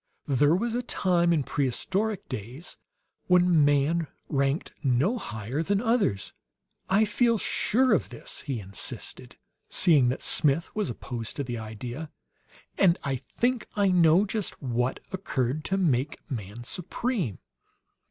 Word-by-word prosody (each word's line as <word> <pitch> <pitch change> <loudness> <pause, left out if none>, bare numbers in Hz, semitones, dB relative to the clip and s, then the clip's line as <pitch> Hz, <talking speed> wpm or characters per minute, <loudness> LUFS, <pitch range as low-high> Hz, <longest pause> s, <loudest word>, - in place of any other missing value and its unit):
There 145 +3 +3
was 230 +5 -1
a 245 - 0
time 175 -7 +1
in 155 -4 +2
prehistoric 190 - -1
days 130 - -7 0.5
when 180 -3 +5
man 145 +3 +2 0.2
ranked 140 +1 0
no 140 - +2
higher 110 - -4
than 195 +4 +1
others. 225 - 0 0.6
I 205 +3 +4
feel 230 +2 +2
sure 250 +4 +2
of 190 - +1
this," - - -7
he 135 -5 -3
insisted, 100 0 -6 0.3
seeing 145 -8 +4
that 125 - -3
Smith 155 +2 +3
was 210 -8 -1
opposed 120 -1 -5
to 140 - -2
the 120 -3 -4
idea; 120 +7 -6 0.7
"and 180 -3 +5
I 140 -2 -1
think 240 - -1
I 200 -2 +3
know 175 +1 +5
just 210 -1 -3
what 125 -1 -1
occurred 150 -6 -2
to 195 - 0
make 145 -7 +1
man 110 -1 -5
supreme." 180 - -2
155 Hz, 135 wpm, -27 LUFS, 125-195 Hz, 0.7 s, when